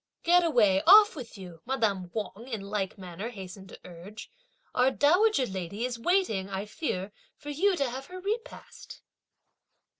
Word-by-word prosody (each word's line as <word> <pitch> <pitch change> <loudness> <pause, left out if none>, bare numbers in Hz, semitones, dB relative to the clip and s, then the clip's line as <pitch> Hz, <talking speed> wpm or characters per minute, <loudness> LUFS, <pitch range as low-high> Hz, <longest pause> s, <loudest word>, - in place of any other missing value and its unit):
"Get 350 +1 +5
away, 215 - +3
off 415 +1 +8
with 245 -7 -9
you!" 175 -4 -11
madame 215 -8 -1
Wang 215 +2 -6
in 225 -6 -4
like 200 0 -3
manner 185 +3 -7
hastened 190 -3 -10
to - - -12
urge; 180 +5 -11 0.4
"our 250 +1 +3
dowager 320 +3 +3
lady 195 +2 -4
is 245 -2 -4
waiting, 230 - +1
I 195 +1 -4
fear, 210 - -4 0.3
for 295 -1 -7
you 375 +7 +2
to 280 -5 0
have 260 +3 -6
her 370 0 -9
repast!" 445 +6 -6
230 Hz, 155 wpm, -28 LUFS, 195-305 Hz, 0.4 s, off